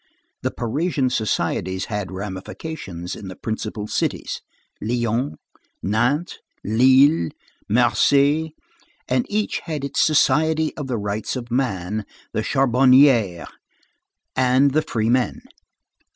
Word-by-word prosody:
The -, -, 0 dB
Parisian 135 Hz, +2 st, -1 dB
societies 95 Hz, -4 st, -1 dB
had 105 Hz, -3 st, -4 dB
ramifications 95 Hz, -, -6 dB
in 100 Hz, -, -9 dB
the 95 Hz, -, -7 dB
principal 110 Hz, 0 st, -4 dB
cities, -, -, -2 dB, 0.4 s
Lyons, 120 Hz, +3 st, -1 dB, 0.5 s
Nantes, 120 Hz, -, 0 dB, 0.2 s
Lille, 130 Hz, -, +4 dB, 0.4 s
Marseilles, 140 Hz, +7 st, +3 dB, 0.6 s
and 250 Hz, -, 0 dB
each 210 Hz, 0 st, -1 dB
had 155 Hz, -5 st, -4 dB
its 140 Hz, 0 st, 0 dB
Society 155 Hz, +1 st, +3 dB
of 145 Hz, -3 st, -5 dB
the 125 Hz, -3 st, -1 dB
Rights 105 Hz, +3 st, -3 dB
of 120 Hz, -2 st, -6 dB
Man, 105 Hz, -5 st, -1 dB, 0.3 s
the 110 Hz, -, 0 dB
Charbonnière, 130 Hz, -, +4 dB, 0.9 s
and 130 Hz, +2 st, +3 dB
The 155 Hz, +3 st, +2 dB
Free 115 Hz, -7 st, -1 dB
Men. 125 Hz, 0 st, 0 dB
125 Hz, 110 wpm, -22 LUFS, 105-140 Hz, 0.9 s, Lille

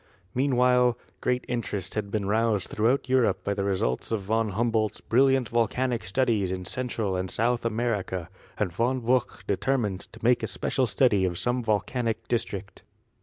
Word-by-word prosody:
Meanwhile 125 Hz, -2 st, +3 dB, 0.2 s
great 125 Hz, 0 st, 0 dB
interest 105 Hz, -6 st, -3 dB
had 105 Hz, -2 st, -2 dB
been 100 Hz, -1 st, -1 dB
roused 105 Hz, -2 st, +1 dB
throughout 120 Hz, +6 st, +1 dB
Europe 125 Hz, -7 st, +2 dB
by 100 Hz, -, 0 dB
the 100 Hz, -1 st, -2 dB
results 95 Hz, -, -1 dB
of 110 Hz, -3 st, 0 dB
Von 110 Hz, +2 st, +1 dB
Humboldt's 110 Hz, 0 st, 0 dB
brilliant 130 Hz, 0 st, +3 dB
volcanic 120 Hz, 0 st, 0 dB
studies 105 Hz, -1 st, +1 dB
in 90 Hz, -1 st, -4 dB
Central 115 Hz, -4 st, -2 dB
and 90 Hz, 0 st, -2 dB
South 120 Hz, +3 st, 0 dB
America, 110 Hz, -6 st, -1 dB, 0.3 s
and 95 Hz, -5 st, -1 dB
Von 125 Hz, +6 st, 0 dB
Buch 125 Hz, +2 st, 0 dB
determined 105 Hz, -2 st, 0 dB
to 115 Hz, -, -13 dB
make 120 Hz, +1 st, +4 dB
a -, -, -1 dB
spe -, -, -5 dB
cial 130 Hz, -2 st, +2 dB
study 105 Hz, -4 st, +3 dB
of 90 Hz, -2 st, 0 dB
some 120 Hz, +5 st, 0 dB
volcanic 115 Hz, +1 st, -1 dB
district. 100 Hz, -4 st, -3 dB
115 Hz, 165 wpm, -27 LUFS, 100-125 Hz, 0.3 s, make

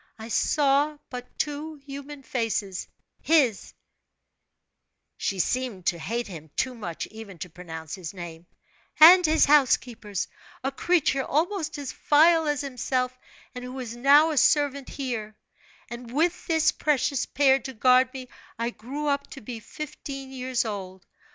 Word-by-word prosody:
I 220 Hz, +1 st, -9 dB
saw 290 Hz, +4 st, +2 dB
but 250 Hz, -1 st, -8 dB
two 300 Hz, +2 st, -3 dB
human 280 Hz, 0 st, -9 dB
faces, 225 Hz, -7 st, -2 dB, 0.3 s
his" 275 Hz, -10 st, +2 dB, 1.4 s
she 195 Hz, -, -2 dB
seemed 220 Hz, -1 st, -1 dB
to 170 Hz, -, +1 dB
hate 235 Hz, +7 st, -2 dB
him 160 Hz, -5 st, -10 dB
too 260 Hz, -, 0 dB
much 180 Hz, -9 st, -5 dB
even 220 Hz, -4 st, -10 dB
to 180 Hz, 0 st, -7 dB
pronounce 160 Hz, -2 st, -8 dB
his 180 Hz, -5 st, -6 dB
name 175 Hz, -2 st, -9 dB, 0.5 s
"and 355 Hz, +4 st, +10 dB
his 320 Hz, -1 st, +4 dB
housekeeper's, 245 Hz, -8 st, +2 dB, 0.4 s
a 270 Hz, -, 0 dB
creature 275 Hz, -2 st, +1 dB
almost 320 Hz, +3 st, -1 dB
as 285 Hz, -2 st, -5 dB
vile 320 Hz, +2 st, +4 dB
as 295 Hz, -1 st, 0 dB
himself, 255 Hz, -1 st, -2 dB, 0.4 s
and 250 Hz, -1 st, -7 dB
who 250 Hz, +1 st, -7 dB
is 235 Hz, -2 st, -6 dB
now 285 Hz, +6 st, +5 dB
a 300 Hz, -, -3 dB
servant 280 Hz, -2 st, +2 dB
here; 225 Hz, -6 st, -5 dB, 0.5 s
and 235 Hz, 0 st, -8 dB
with 335 Hz, +6 st, 0 dB
this 320 Hz, -2 st, +3 dB
precious 285 Hz, -2 st, 0 dB
pair 270 Hz, -1 st, +4 dB
to 265 Hz, -, -7 dB
guard 255 Hz, +2 st, +4 dB
me 260 Hz, -1 st, -8 dB, 0.3 s
I 235 Hz, +1 st, -1 dB
grew 265 Hz, +7 st, -6 dB
up 280 Hz, -1 st, 0 dB
to 275 Hz, -, -10 dB
be 235 Hz, +1 st, -7 dB
fifteen 275 Hz, +1 st, -8 dB
years 255 Hz, -2 st, -1 dB
old. 190 Hz, -4 st, -6 dB
260 Hz, 145 wpm, -26 LUFS, 220-290 Hz, 1.4 s, and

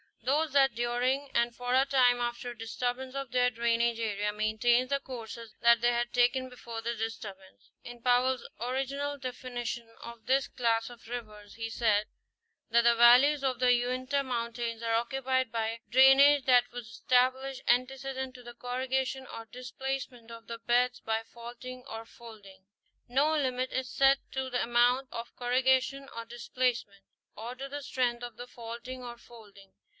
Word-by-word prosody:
—Those 295 Hz, +4 st, +1 dB
that 275 Hz, -1 st, +4 dB
during 245 Hz, +4 st, 0 dB
and 235 Hz, 0 st, +2 dB
for 245 Hz, 0 st, -1 dB
a 265 Hz, +1 st, +5 dB
time 255 Hz, -3 st, +4 dB
after 240 Hz, +1 st, -3 dB
a 240 Hz, -, -12 dB
disturbance 245 Hz, +3 st, -3 dB
of 275 Hz, -3 st, -4 dB
their 250 Hz, 0 st, +3 dB
drainage 235 Hz, 0 st, +1 dB
area 210 Hz, -2 st, -1 dB
maintain 225 Hz, +4 st, +2 dB
the 280 Hz, +1 st, 0 dB
courses 230 Hz, -4 st, -8 dB
that 235 Hz, -1 st, +5 dB
they 240 Hz, 0 st, +4 dB
had 240 Hz, 0 st, -1 dB
taken 255 Hz, +1 st, +2 dB
before 235 Hz, -2 st, -8 dB
the 235 Hz, +1 st, -2 dB
disturbance. 200 Hz, -, -7 dB
In 240 Hz, -1 st, -10 dB
Powell's 250 Hz, +1 st, +2 dB
original 270 Hz, +4 st, -2 dB
definition 245 Hz, -2 st, -5 dB
of 235 Hz, -1 st, -10 dB
this 265 Hz, +1 st, +2 dB
class 230 Hz, -2 st, 0 dB
of 240 Hz, -2 st, -14 dB
rivers, 215 Hz, -4 st, -8 dB
he 225 Hz, 0 st, -4 dB
said 215 Hz, -2 st, +1 dB, 0.6 s
that 235 Hz, +1 st, +5 dB
the 235 Hz, 0 st, +5 dB
valleys 250 Hz, +5 st, +6 dB
of 260 Hz, -2 st, 0 dB
the 250 Hz, -1 st, +5 dB
Uinta 255 Hz, +3 st, 0 dB
mountains 235 Hz, -2 st, -3 dB
are 230 Hz, -1 st, 0 dB
occupied 260 Hz, +1 st, 0 dB
by 225 Hz, 0 st, -2 dB
"drainage 270 Hz, +2 st, +6 dB
that 250 Hz, -2 st, +4 dB
was 245 Hz, -2 st, -7 dB
established 255 Hz, +3 st, +1 dB
ante 255 Hz, +2 st, +3 dB
cedent 265 Hz, -1 st, -5 dB
to 250 Hz, -, -12 dB
the 240 Hz, 0 st, -10 dB
corrugation 260 Hz, +1 st, -2 dB
or 225 Hz, -, -8 dB
displacement 250 Hz, -1 st, -6 dB
of 230 Hz, 0 st, -11 dB
the 230 Hz, 0 st, -6 dB
beds 245 Hz, +2 st, +1 dB
by 225 Hz, 0 st, -1 dB
faulting 240 Hz, +2 st, -10 dB
or 225 Hz, 0 st, -7 dB
folding."* 210 Hz, -5 st, -14 dB, 0.4 s
No 280 Hz, +5 st, +2 dB
limit 255 Hz, -3 st, -1 dB
is 260 Hz, -1 st, -2 dB
set 270 Hz, 0 st, +4 dB
to 265 Hz, 0 st, -3 dB
the 245 Hz, -1 st, 0 dB
amount 245 Hz, +3 st, +2 dB
of 230 Hz, 0 st, -7 dB
corrugation 260 Hz, +2 st, +1 dB
or 230 Hz, 0 st, -5 dB
displacement 235 Hz, -3 st, -2 dB, 0.3 s
or 230 Hz, +3 st, -6 dB
to 270 Hz, +2 st, -6 dB
the 290 Hz, +1 st, -6 dB
strength 245 Hz, -2 st, -1 dB
of 240 Hz, -2 st, -7 dB
the 245 Hz, +1 st, -8 dB
faulting 240 Hz, +2 st, -8 dB
or 240 Hz, -1 st, -8 dB
folding. 205 Hz, -5 st, -16 dB
245 Hz, 165 wpm, -30 LUFS, 230-260 Hz, 0.6 s, valleys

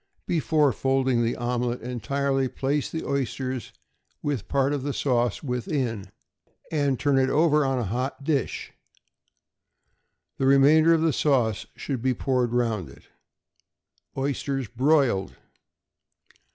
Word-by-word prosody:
Before 150 Hz, -2 st, +2 dB
folding 130 Hz, -2 st, +1 dB
the 115 Hz, -, 0 dB
omelet 120 Hz, 0 st, -2 dB
entirely, 135 Hz, +3 st, -1 dB
place 140 Hz, +2 st, -1 dB
the 160 Hz, -, -5 dB
oysters 130 Hz, -2 st, -3 dB, 0.5 s
with 140 Hz, -8 st, -2 dB
part 140 Hz, +1 st, +1 dB
of 145 Hz, -, -2 dB
the 140 Hz, +1 st, -3 dB
sauce 120 Hz, -4 st, 0 dB
within, 125 Hz, -4 st, -2 dB, 0.6 s
and 145 Hz, -5 st, 0 dB
turn 140 Hz, -2 st, +2 dB
it 130 Hz, 0 st, +2 dB
over 150 Hz, +1 st, +3 dB
on 135 Hz, -1 st, 0 dB
a 125 Hz, -, -1 dB
hot 130 Hz, +6 st, -3 dB
dish. 140 Hz, -4 st, -2 dB, 1.7 s
The 135 Hz, -, +2 dB
remainder 155 Hz, +4 st, +6 dB
of 160 Hz, -, 0 dB
the 160 Hz, -2 st, +2 dB
sauce 115 Hz, -7 st, +1 dB
should 135 Hz, -5 st, -4 dB
be 130 Hz, 0 st, +1 dB
poured 125 Hz, -2 st, 0 dB
round 115 Hz, -, -1 dB
it. -, -, -17 dB, 1.1 s
=Oysters 135 Hz, -1 st, -2 dB
Broiled. 130 Hz, -5 st, +1 dB
135 Hz, 125 wpm, -25 LUFS, 120-140 Hz, 1.7 s, remainder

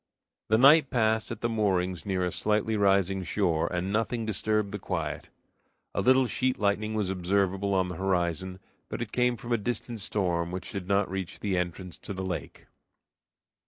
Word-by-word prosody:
The 110 Hz, -, +4 dB
night 140 Hz, +3 st, +7 dB
passed 110 Hz, -2 st, +1 dB
at 115 Hz, -2 st, -6 dB
the 120 Hz, -, +1 dB
moorings 95 Hz, -5 st, 0 dB
near 95 Hz, -2 st, 0 dB
a 90 Hz, -, -1 dB
slightly 110 Hz, +3 st, 0 dB
rising 95 Hz, -2 st, +2 dB
shore, 85 Hz, -4 st, 0 dB
and 90 Hz, +2 st, -2 dB
nothing 115 Hz, +1 st, 0 dB
disturbed 105 Hz, -1 st, 0 dB
the 105 Hz, -, -4 dB
quiet. 80 Hz, -6 st, -4 dB, 0.6 s
A -, -, 0 dB
little 130 Hz, +1 st, +5 dB
sheet 130 Hz, +1 st, 0 dB
lightning 105 Hz, +1 st, 0 dB
was 105 Hz, -3 st, 0 dB
observable 95 Hz, +1 st, 0 dB
on 95 Hz, -1 st, +2 dB
the 90 Hz, -2 st, -6 dB
horizon, 95 Hz, -1 st, -1 dB, 0.3 s
but -, -, -3 dB
it 110 Hz, -, -10 dB
came 125 Hz, -1 st, +1 dB
from 120 Hz, +2 st, -8 dB
a 120 Hz, -, +4 dB
distant 120 Hz, +1 st, -3 dB
storm 90 Hz, -4 st, 0 dB
which 90 Hz, +1 st, -5 dB
did 100 Hz, -3 st, -5 dB
not 100 Hz, 0 st, +2 dB
reach 95 Hz, -1 st, -5 dB
the 100 Hz, -3 st, -1 dB
entrance 90 Hz, 0 st, -4 dB
to 100 Hz, -, -7 dB
the 95 Hz, 0 st, -4 dB
lake. 90 Hz, -2 st, -5 dB
100 Hz, 180 wpm, -28 LUFS, 90-110 Hz, 0.6 s, night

